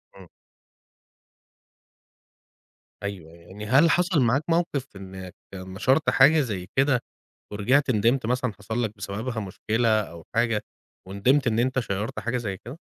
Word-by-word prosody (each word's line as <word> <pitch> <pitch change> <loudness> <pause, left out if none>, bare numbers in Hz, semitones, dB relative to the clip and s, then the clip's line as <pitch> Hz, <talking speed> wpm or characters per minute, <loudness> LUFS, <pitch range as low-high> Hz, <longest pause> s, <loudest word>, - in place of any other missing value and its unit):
إمم. - - -13 2.8
أيوه، 90 -6 -6
يعني 95 +5 -11
هل 135 +9 +5
حصل 175 -3 +2
معاك 130 +5 +2
موقف 165 -5 0
إنك 95 -1 -9 0.2
نشرت 95 +11 0
حاجة 150 +4 +6
زي 100 -9 -4
كده 135 -1 +3 0.5
ورجعت 130 +7 +2
ندمت، 115 +3 +2
مثلًا 125 -1 -1
حصل 110 +4 -2
لك 110 -1 -3
بسببها 110 +4 -4
مشكلة 110 +3 -1
أو 85 -4 -10
حاجة، 115 -2 +2 0.5
وندمت 125 +9 +2
إن 115 0 +1
أنت 130 +2 +1
شيّرت 105 -2 -3
حاجة 120 +2 -2
زي 100 -5 -4
كده؟ 130 +6 -8
115 Hz, 130 wpm, -25 LUFS, 100-130 Hz, 2.8 s, حاجة